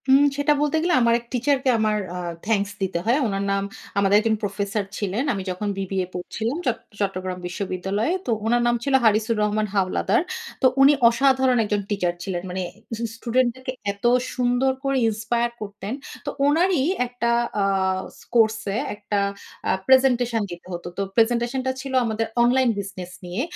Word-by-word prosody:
উম 270 +1 +7 0.2
সেটা 290 +1 +3
বলতে 295 +1 +1
গেলে 350 - +2
আমার 235 0 +4
এক 235 - -18
টিচারকে 265 +1 +1
আমার 215 -1 +2 0.2
আ - - -4 0.3
থ্যাংকস 205 -2 +1
দিতে 190 -3 -1
হয়। 240 +4 +3
উনার 195 -1 -2
নাম, 195 0 +1 0.3
আমাদের 200 0 +4
একজন 220 0 +1
প্রফেসর 200 +1 -1
ছিলেন। 205 +4 -1
আমি 195 -2 -4
যখন 185 +3 -4
বিবিএ 190 -1 -1
পড়ছিলাম 220 - -3
চট 240 -2 +1 0.2
চট্টগ্রাম 185 -2 -2
বিশ্ববিদ্যালয়ে। 190 - -2
তো 245 - -1
উনার 240 +2 +3
নাম 240 - +3
ছিল 275 - -1
'হারিসুর 220 0 +3
রহমান 210 0 0
হাওলাদার।' 195 - +2 0.4
তো 260 - +6
উনি 275 +2 +8 0.2
অসাধারণ 260 +1 +3
একজন 205 0 0
টিচার 180 -4 0
ছিলেন। 180 -2 -3
মানে 185 +1 -3 0.5
স্টুডেন্টদেরকে 255 +2 -1 0.2
এত 200 +3 -10 0.3
সুন্দর 245 +1 +2
করে 275 0 +1
inspire 235 +2 -1
করতেন। 205 +1 -6 0.3
তো - - -1 0.2
উনারই 330 0 +3 0.2
একটা 240 -1 -2 0.3
আ - - +3 0.7
কোর্স 220 -1 +4 0.2
এ - - 0 0.2
একটা 205 0 -2 0.5
আ - - +3 0.2
প্রেজেন্টেশন 250 -3 +4
দিতে 175 +1 -9
হত। 175 - -5
তো - - -1
প্রেজেন্টেশনটা 240 +3 +2
ছিল 270 -1 -6
আমাদের 225 0 -1 0.2
অনলাইন 250 +1 +4
বিজনেস 185 -2 -6
নিয়ে। 180 +6 -3
225 Hz, 160 wpm, -23 LUFS, 200-255 Hz, 0.7 s, উনি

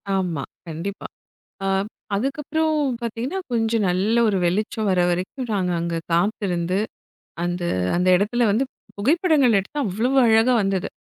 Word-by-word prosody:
ஆமா, 175 -7 -1 0.2
கண்டிப்பா. 170 +5 -5 0.6
ஆ - - 0 0.5
அதுக்கப்புறம் 300 +7 0 0.3
பாத்தீங்கன்னா, 240 - -3
கொஞ்சம் 225 -2 +1
நல்ல 195 +6 +1
ஒரு 200 -2 +1
வெளிச்சம் 210 +4 0
வர 185 - +2
வரைக்கும் 185 +9 -3
நாங்க 185 -3 0
அங்க 170 0 -2 0.2
காத்திருந்து, 180 -1 0 0.7
அந்த 175 0 -2 0.3
அந்த 180 +1 +2
இடத்துல 225 +5 +1
வந்து 225 +7 +2 0.3
புகைப்படங்கள் 285 - +3
எடுத்தா 195 +10 -5
அவ்வளவு 225 +8 0
அழகா 225 +3 +4
வந்தது. 195 -2 -1
210 Hz, 125 wpm, -22 LUFS, 180-240 Hz, 0.7 s, அழகா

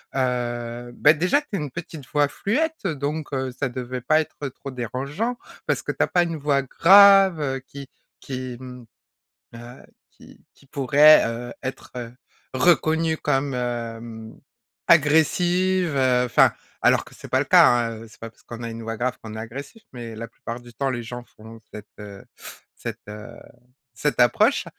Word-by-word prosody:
heu, 120 -2 -2
bah 145 - +6
déjà 180 - +2
tu 295 - -23
as - - +1
une 150 -3 -5
petite 155 -2 -8
voix 145 -1 +3
fluette, 300 - -1
heu, 175 - 0
donc 145 +2 -4
heu, 130 -2 -2
ça 135 - -1
devait 125 0 -5
pas 155 +6 +3
être 150 -2 -4
trop 135 +2 -10
dérangeant 140 - -3 0.3
parce - - 0
que - - -4
tu - - -4
as - - 0
pas 175 - +2
une 170 -1 -3
voix 140 -1 +1
grave, 195 +4 +6
heu, 135 -3 -2
qui 140 0 -10 0.3
qui, 130 -2 -6
mmh, 125 -1 -10 0.7
heu, 120 +2 -12 0.3
qui - - -18
qui 140 - -24
pourrait, 140 +3 +6
heu, 120 +1 -6
être, 130 0 -7
heu, 120 -1 -7 0.4
reconnue 160 +2 +2
comme, 140 -2 -1
hem, 115 -2 -5 0.5
agressive, 175 +3 +3
heu 125 -2 +3
enfin, 120 - +4 0.3
alors - - +4
que - - -17
c'est - - -12
pas - - +1
le - - 0
cas, - - +7
hein, 120 -1 +2
heu, - - -12
c'est 110 - -19
pas 115 - -6
parce - - -27
qu'on 120 0 -9
a 115 - -4
une 115 0 -7
voix 115 0 -4
grave 125 +2 -2
qu'on 110 -1 -9
est - - -6
agressif, 140 - -9
mais 120 -3 -8
la 115 +1 -7
plupart 115 +1 -8
du 120 0 -15
temps 135 +3 -1
les 120 -2 -4
gens 120 +1 -8
font 110 +1 -14
cette, 105 0 -9
heu 100 -1 -10 0.5
cette, - - -7
heu 105 +3 -9 0.6
cette 145 +2 0
approche. 120 -1 +3
130 Hz, 185 wpm, -23 LUFS, 120-155 Hz, 0.7 s, cas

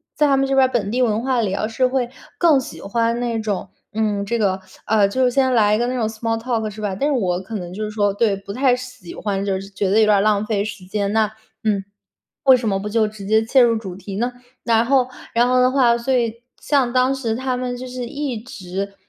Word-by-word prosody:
在 300 - +3
他 275 - +4
们 270 - +2
这 270 - +1
边 265 -1 +5
儿 - - -10
本 205 -5 0
地 250 +2 0
文 220 -1 +1
化 255 -1 +1
里 195 -4 -1
哦， - - -2
要 215 - 0
是 240 +3 +1
会 250 -2 -1 0.3
更 320 -6 +5
喜 165 -10 -8
欢 230 +3 0
那 235 -2 -1
种， 210 -3 -3 0.2
嗯， 210 -2 0
这 235 +3 -1
个， 190 -2 +1 0.3
呃， 210 -2 +4
就 260 +6 0
是 250 - +3
先 260 -1 +2
来 210 -2 +4
一 215 - -1
个 240 - +1
那 255 - -2
种 230 -3 0
small 225 +1 -2
talk 225 -2 -1
是 215 +1 -9
吧。 200 -2 -2
但 285 - +1
是 295 - +1
我 185 -8 0
可 220 +4 -7
能 175 -4 -5
就 215 - -4
是 210 - -3
说 205 -1 +1
对， 205 0 +2
不 195 0 -9
太 255 +2 +3
喜 250 -7 -9
欢， 200 -1 -2
就 190 -1 0
是 195 - -10
觉 195 0 -1
得 205 +3 +4
有 220 - +6
点 210 -1 +4
儿 - - +3
浪 210 0 +2
费 210 -2 0
时 195 -3 -7
间。 200 +1 -2
那 220 -1 +2 0.3
嗯， 205 -3 +1 0.6
为 265 -2 +7
什 235 -3 -3
么 195 - +1
不 210 - -4
就 220 0 +2
直 210 -2 -9
接 220 +2 +3
切 260 +3 +4
入 235 -1 +5
主 190 -5 -7
题 195 +1 -7
呢？ 245 +2 -1 0.3
然 230 -1 +3
后， 260 0 +3 0.3
然 240 +1 +3
后 255 0 +3
的 255 0 +4
话 245 -3 +4
所 235 +3 -1
以， 235 -3 +1 0.3
像 270 -5 +2
当 255 +2 +2
时 235 -4 -2
他 260 +1 -2
们 250 0 -3
就 255 +1 -7
是 250 -1 -5
一 280 -1 -3
直， 200 -3 -6
225 Hz, 310 characters per minute, -21 LUFS, 205-250 Hz, 0.6 s, 为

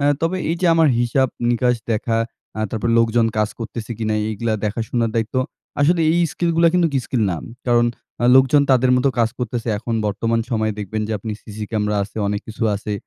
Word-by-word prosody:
অ্যা 145 - +3
তবে 165 +3 +1
এই 170 - 0
যে 180 - +2
আমার 160 -2 +4
হিসাব 120 +2 +2 0.2
নিকাশ 125 +1 +2 0.2
দেখা, 115 +1 0 0.4
অ্যা 110 - -3
তারপর 115 +1 -2
লোকজন 115 0 +3
কাজ 105 -1 +2
করতেছে 115 0 -6
কিনা, 110 -1 -1 0.2
এইগ্লা 110 +1 -2
দেখাশোনার 115 +2 -1
দায়িত্ব। 110 +1 -1 0.5
আসলে 165 +4 +3
এই 175 - +2
স্কিলগুলা 170 -1 +2
কিন্তুক 170 -4 +2
স্কিল 120 -4 0
না। 85 - -2 0.3
কারণ 120 -1 +4 0.4
আ - - +3
লোকজন 135 +2 +5
তাদের 130 0 +4
মতো 130 +2 +2
কাজ 115 -1 +3
করে 130 - -30
করতেসে। 120 -1 -3
এখন 115 +1 -3
বর্তমান 115 +3 0
সময়ে 110 -2 0
দেখবেন 110 +2 -3
যে - - -2
আপনি 110 +2 -5
সিসি 105 0 -7
ক্যামেরা 105 -1 0
আছে। 105 - -15
অনেক 100 0 -1
কিছু 110 +2 -7
আছে। 105 +1 -5
115 Hz, 195 wpm, -20 LUFS, 110-130 Hz, 0.5 s, লোকজন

